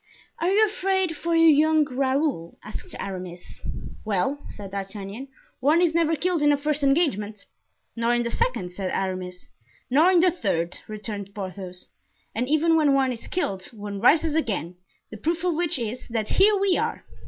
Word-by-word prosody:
"Are 340 - +1
you 420 +3 +5
afraid 380 -4 0
for 335 +2 -1
your 330 -1 +7
young 310 +1 +4
Raoul?" 265 - -1
asked 215 - -8
Aramis. 180 -2 -7 0.4
"Well," 220 +7 0
said 200 -2 -9
D'Artagnan, 200 +5 -6 0.3
"one 295 +6 +4
is 345 -2 +3
never 330 -1 +2
killed 345 +1 0
in 295 0 +5
a 290 - +3
first 295 +1 -1
engagement." 270 - +1 0.5
"Nor 235 +1 +1
in 240 - +1
the 235 - -3
second," 465 - -1
said 185 +1 -4
Aramis 185 -1 -4 0.4
"Nor 315 +8 +5
in 360 - +5
the 360 +1 +5
third," 180 - -2
returned 205 -2 -6
Porthos; 185 -2 -7 0.5
"and 245 +4 -2
even 320 +2 +3
when 295 -3 +4
one 265 -1 +2
is 235 -2 -7
killed, 195 - -2
one 205 -3 -7
rises 310 +5 +4
again, 210 - -1 0.4
the 215 - -7
proof 330 - -1
of 360 -1 +2
which 330 -1 0
is, 235 0 -5
that 225 -2 -2
here 410 +2 +5
we 390 -2 +2
are!" - - -2
265 Hz, 175 wpm, -25 LUFS, 200-325 Hz, 0.5 s, your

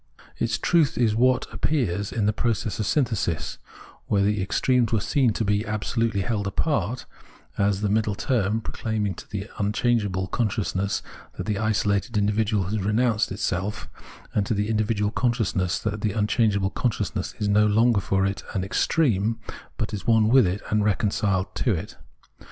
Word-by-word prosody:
Its - - 0
truth 165 -3 +2
is 115 -3 +3
what 125 +2 +3
appears 105 - -1
in 110 -3 -1
the 105 - +2
process 110 -2 -1
of 105 - -1
synthesis 115 - -1 0.2
— - - -23
where 100 -1 +2
the 105 0 +1
extremes 120 +4 +1
were 110 - +2
seen 130 +3 +2
to 110 - -2
be 105 +1 +1
absolutely 105 0 -1
held 100 -1 -1
apart 125 +1 -1 0.3
— - - -28
as 100 -1 -1
the 105 - +1
middle 105 0 +1
term, 110 -3 0
proclaiming 110 -3 -2
to - - -12
the 100 0 -4
unchangeable 105 -2 +1
con 110 +3 0
sciousness 100 -2 -2 0.3
that 90 - -4
the 105 -2 -1
isolated 110 +1 0
individual 105 0 +1
has 105 +4 -2
renounced 110 +2 +1
itself, 95 0 -2 0.5
and 100 -2 0
to 115 - 0
the 105 +1 -1
individual 105 -1 0
consciousness 110 -7 0
that 105 -1 -3
the 105 -1 -1
un 105 -2 +2
changeable 105 -4 +1
consciousness 105 -5 -2
is 105 - -1
no 105 +1 +4
longer 110 0 +3
for 95 0 +1
it 100 0 -2
an 95 - 0
extreme, 110 - +1 0.4
but 110 -1 -3
is 100 - -5
one 110 -2 +4
with 125 -4 +6
it 95 +4 -3
and 105 -1 +2
reconciled 100 -2 0
to 120 -7 +1
it. 90 +6 -6
105 Hz, 175 wpm, -25 LUFS, 100-115 Hz, 0.5 s, with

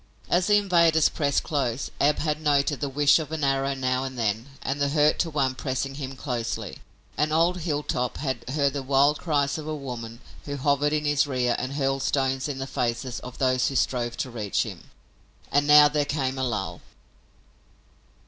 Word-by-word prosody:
As 175 +1 +3
the 210 - +5
invaders 170 -6 +4
pressed 140 -2 0
close 135 -4 -2
Ab 145 +1 +3
had 150 0 -1
noted 145 -1 +1
the 145 - -1
whish 145 +2 +4
of 155 -1 -6
an 160 -2 -3
arrow 135 0 +1
now 130 -1 -1
and 130 -1 -6
then 110 +1 -1 0.2
and 140 +2 -2
the 140 - +2
hurt 150 +1 +3
to 170 - +1
one 135 -4 0
pressing 130 +1 -3
him 135 -1 -6
closely, 115 - -4 0.4
and 150 +1 +1
old 170 +3 +2
Hilltop 145 -6 -2
had 130 -3 -4
heard 140 0 +1
the 140 - -3
wild 140 +2 +3
cries 145 -3 0
of 155 - -7
a 155 - -2
woman 120 -5 -7 0.3
who 145 -1 -4
hovered 145 +1 +1
in 150 0 -1
his 145 0 +2
rear 125 -3 0
and 130 +2 -4
hurled 135 -1 0
stones 135 0 0
in 145 -2 -4
the 135 - -3
faces 120 -1 -2
of 125 0 -10
those 130 -1 +2
who 135 - -3
strove 120 -2 0
to 130 - -3
reach 105 -4 -1
him. - - -9 0.6
And 145 +1 +2
now 150 0 +9
there 145 0 0
came 135 -2 -2
a - - -1
lull. 110 -6 -3
140 Hz, 195 wpm, -25 LUFS, 130-150 Hz, 0.6 s, now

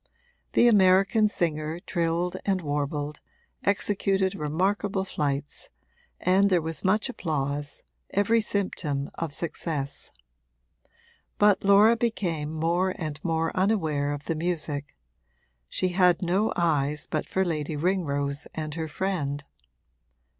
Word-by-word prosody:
The 240 - +5
American 195 +1 +5
singer 160 -4 -2
trilled 170 0 -1
and 195 -2 +1
warbled, 145 0 -2 0.4
executed 195 -1 +1
remarkable 190 +4 0
flights, 145 -4 -3 0.5
and 190 +2 +3
there 180 -2 +4
was 160 -2 -5
much 210 +5 +2
applause, 145 - -3 0.3
every 220 +3 +2
symptom 165 -9 -2
of 165 -3 -4
success; 150 -3 -3 1.3
but 205 -2 +4
Laura 200 +3 +6
became 180 -10 -1
more 170 +4 0
and 155 -3 -5
more 165 -1 0
unaware 160 -8 +1
of 145 0 -5
the - - 0
music 155 -3 -3 0.7
she 185 - 0
had 180 0 +3
no 190 +5 +1
eyes 150 -4 +1
but - - -3
for 190 0 0
Lady 155 -3 -2
Ringrose 145 -4 -1
and 155 -1 -4
her 160 0 -3
friend. 150 -4 -2
170 Hz, 115 wpm, -26 LUFS, 150-190 Hz, 1.3 s, Laura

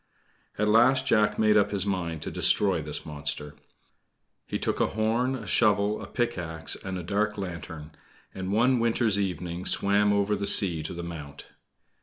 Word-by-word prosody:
At 105 - +1
last 130 +5 +4
Jack 110 -5 +2
made 110 -1 +3
up 105 -1 +4
his 100 -1 -1
mind 85 -6 -3
to - - -5
destroy 95 -5 +2
this 75 -1 -6
monster. 75 -1 -4 0.9
He - - -2
took - - -2
a - - +3
horn, 115 +4 0
a 115 -5 -7
shovel, 105 0 +2
a - - -8
pickaxe, 85 -10 -3
and 95 -1 -6
a 90 - -6
dark 105 +4 -1
lantern, 85 -5 -7 0.4
and 95 0 -5
one 120 +4 +3
winter's 115 -3 +1
evening 90 -2 -3
swam 100 +1 +3
over 100 0 +1
the 100 0 -2
sea 85 -5 +3
to 80 +3 -6
the 85 - -6
Mount. 75 -4 -9
100 Hz, 170 wpm, -27 LUFS, 85-105 Hz, 0.9 s, last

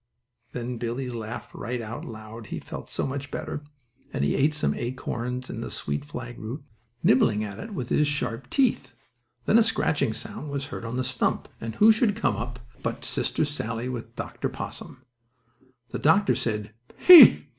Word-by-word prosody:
Then 120 -1 -4
Billie 120 +2 -3
laughed 115 0 -6
right 125 +1 -4
out 115 0 -6
loud, 110 -1 -9
he - - -4
felt - - -8
so - - -2
much 140 +1 -4
better, 145 - -4 0.5
and - - -1
he - - +2
ate 150 +3 +2
some 150 - +1
acorns 125 0 -4
and - - -6
the - - -4
sweet 70 0 -3
flag 120 -4 -7
root, 120 +7 -6 0.4
nibbling 110 -4 +4
at 100 -2 -6
it 220 -2 -7
with 125 -7 -4
his 150 - +3
sharp 130 -4 -2
teeth. 180 - +1 0.5
Then 225 - +5
a - - +7
scratching 160 - +2
sound 150 +6 -7
was 140 -1 -3
heard 130 - -7
on 115 +2 -3
the 130 - 0
stump, 130 -1 -1
and 115 -1 -5
who 220 +2 +7
should 220 -2 +2
come 120 - +1
up 120 +4 -5 0.2
it - - -25
but - - -3
Sister - - 0
Sallie, 120 -4 -3
with 115 -2 -6
Dr. - - -4
Possum. 130 0 -8 0.8
The - - -4
doctor 195 +7 +4
said 105 -2 -2 0.2
"He!" 310 - +10
125 Hz, 180 wpm, -26 LUFS, 115-145 Hz, 0.8 s, He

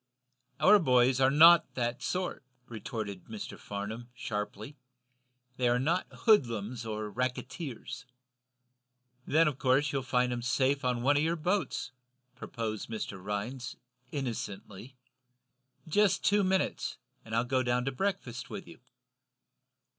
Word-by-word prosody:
"Our 210 0 +7
boys 130 -4 +4
are 130 - +6
not 165 +4 +7
that 120 -1 -1
sort," 185 -5 -2 0.2
retorted 110 -4 -6
Mr. 110 -2 -7
Farnum, 110 +4 -6
sharply. 105 +4 -5 0.8
"They 125 -1 +2
are 120 - +3
not 165 +8 0
hoodlums 115 - +2
or 110 -1 -3
racketers." 130 - -4 1.2
"Then 160 +2 +4
of 145 -4 -2
course 135 +3 +3
you'll 135 - -1
find 125 -1 +1
'em 120 - -3
safe 135 +3 +1
on 125 -1 0
one 145 +2 +4
of - - +3
your 165 +2 +1
boats," 180 -5 -1 0.4
proposed 115 -4 -5
Mr. 105 -4 -5
Rhinds, 120 +6 -4 0.4
innocently. 120 -3 -5 0.9
"Just 195 +3 +3
two 205 0 +4
minutes, 190 0 0 0.3
and 110 0 -5
I'll 115 - +3
go 130 +1 +1
down 125 0 0
to 135 - 0
breakfast 130 -6 -3
with - - -7
you." - - -13
125 Hz, 130 wpm, -30 LUFS, 115-145 Hz, 1.2 s, Our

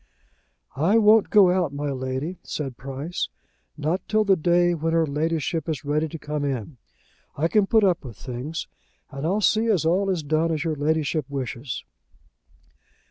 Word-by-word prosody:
"I 170 +10 +3
won't 215 -1 +5
go 195 -4 +6
out, 180 -5 +1
my 145 0 -2
Lady," 130 +6 -4
said 135 -5 -5
Price, 135 +7 -4 0.5
"not 160 +5 -1
till 215 0 +2
the 200 -2 +4
day 175 +1 +3
when 165 0 -1
her 165 -1 +3
Ladyship 160 +2 -1
is 155 -2 -3
ready 150 +2 +1
to 160 - -7
come 150 -1 -4
in. 135 -1 -3 0.6
I 155 +4 +1
can 205 +2 +2
put 220 0 +4
up 180 -5 +2
with 120 -7 -9
things, 125 - -5 0.4
and 140 +2 -3
I'll 200 +5 +1
see 220 +2 +3
as 190 -8 +2
all 190 +4 +2
is 180 -5 -1
done 155 +3 +1
as 155 -1 -1
your 160 -2 -1
Ladyship 150 0 0
wishes." 130 -2 -4
160 Hz, 170 wpm, -24 LUFS, 140-180 Hz, 0.6 s, go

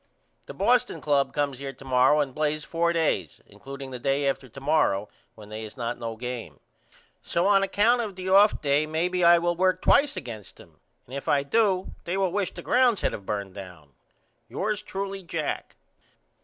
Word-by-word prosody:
The - - -9
Boston 245 -8 +2
Club 145 -2 +1
comes 140 -3 -2
here 135 -1 -5
to 135 +1 -15
morrow 130 +3 +4
and 135 -3 -3
plays 150 0 -1
4 170 +1 0
days 155 - -1
includeing 135 +6 -9
the 125 - -6
day 140 +3 0
after 135 -1 -2
to 135 - -11
morrow 135 -9 +1 0.3
when 105 -1 -13
they 110 +1 -6
is 110 0 -10
not 120 0 -3
no 115 -2 -4
game. 125 0 -6 0.6
So 170 - -1
on 200 -1 +5
account 210 +5 +2
of 210 -4 -5
the 185 0 -6
off 200 +3 +5
day 145 +1 +2
maybe 175 +3 0
I 170 0 +7
will 175 0 0
work 185 +1 +2
twice 290 +7 +3
against 110 -5 -8
them - - -18 0.3
and 125 - -14
if 140 - -6
I 140 -1 +3
do 190 +3 +1
they 175 +3 -2
will 190 -2 +1
wish 200 -1 -1
the - - -10
grounds 245 -5 +3
had - - 0
of 100 - -8
burned 100 -2 -3
down. 90 -8 -11 0.6
Yours 210 0 -2
truly, 195 -1 -5
JACK. 165 -4 -4
150 Hz, 195 wpm, -26 LUFS, 125-190 Hz, 0.6 s, I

